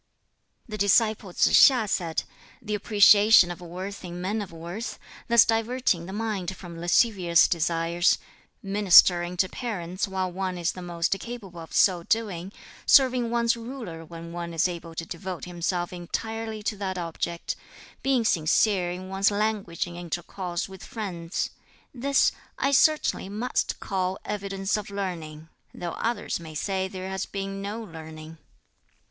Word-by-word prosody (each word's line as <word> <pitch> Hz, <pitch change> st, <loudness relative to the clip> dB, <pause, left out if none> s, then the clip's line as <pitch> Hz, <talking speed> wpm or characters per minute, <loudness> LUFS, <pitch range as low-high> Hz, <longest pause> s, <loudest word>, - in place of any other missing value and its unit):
The 215 Hz, -2 st, -6 dB
disciple 205 Hz, 0 st, +3 dB
Tsz -, -, +3 dB, 0.2 s
hiŠ 245 Hz, -5 st, -1 dB
said, 170 Hz, -5 st, -1 dB, 0.4 s
"The 215 Hz, -2 st, -5 dB
appreciation 210 Hz, -2 st, +6 dB
of 175 Hz, -, -8 dB
worth 185 Hz, +4 st, -7 dB
in 175 Hz, -1 st, -7 dB
men 205 Hz, +4 st, -2 dB
of 195 Hz, -, -7 dB
worth, 170 Hz, +7 st, -6 dB, 0.3 s
thus 235 Hz, -1 st, +6 dB
diverting 225 Hz, -6 st, 0 dB
the -, -, -6 dB
mind 200 Hz, -3 st, -3 dB
from 170 Hz, -3 st, -10 dB
lascivious 175 Hz, -2 st, +4 dB
desires 170 Hz, +1 st, +1 dB, 0.5 s
ministering 180 Hz, -3 st, +5 dB
to 185 Hz, -, +3 dB
parents 185 Hz, -5 st, -4 dB
while 190 Hz, -1 st, -2 dB
one 185 Hz, 0 st, -3 dB
is 170 Hz, -1 st, 0 dB
the 185 Hz, -, -9 dB
most 170 Hz, -1 st, -2 dB
capable 210 Hz, -8 st, -8 dB
of 165 Hz, -, -11 dB
so 180 Hz, -3 st, +4 dB
doing 195 Hz, -2 st, -1 dB, 0.4 s
serving 255 Hz, -4 st, +5 dB
one's 235 Hz, 0 st, +2 dB
ruler 230 Hz, -9 st, -7 dB
when 165 Hz, +1 st, -9 dB
one 170 Hz, -1 st, -5 dB
is 165 Hz, +3 st, +3 dB
able 170 Hz, -2 st, -7 dB
to 165 Hz, -, -4 dB
devote 180 Hz, +1 st, -6 dB
himself 175 Hz, 0 st, -2 dB
entirely 220 Hz, +5 st, -4 dB
to 215 Hz, -, -1 dB
that 190 Hz, -2 st, -3 dB
object 170 Hz, 0 st, -3 dB, 0.5 s
being 265 Hz, -4 st, +2 dB
sincere 180 Hz, +1 st, +2 dB
in 180 Hz, +1 st, -6 dB
one's 195 Hz, +1 st, +2 dB
language 205 Hz, -4 st, -1 dB
in 175 Hz, -1 st, -9 dB
intercourse 175 Hz, +1 st, -4 dB
with 190 Hz, -1 st, -11 dB
friends: 180 Hz, -6 st, -4 dB, 0.4 s
this 275 Hz, +2 st, +2 dB, 0.3 s
I 275 Hz, -, +1 dB
certainly 300 Hz, -8 st, +3 dB
must 215 Hz, +5 st, -2 dB
call 190 Hz, -1 st, -2 dB
evidence 195 Hz, -1 st, -2 dB
of 210 Hz, -, -6 dB
learning, 165 Hz, -6 st, -5 dB, 0.3 s
though 175 Hz, -1 st, -4 dB
others 230 Hz, -1 st, -2 dB
may 160 Hz, -2 st, -10 dB
say 190 Hz, +3 st, -1 dB
there 190 Hz, 0 st, -6 dB
has 190 Hz, -1 st, -3 dB
been 195 Hz, 0 st, -5 dB
'no 205 Hz, +3 st, -4 dB
learning.'" 160 Hz, -3 st, -10 dB
190 Hz, 150 wpm, -26 LUFS, 175-215 Hz, 0.5 s, appreciation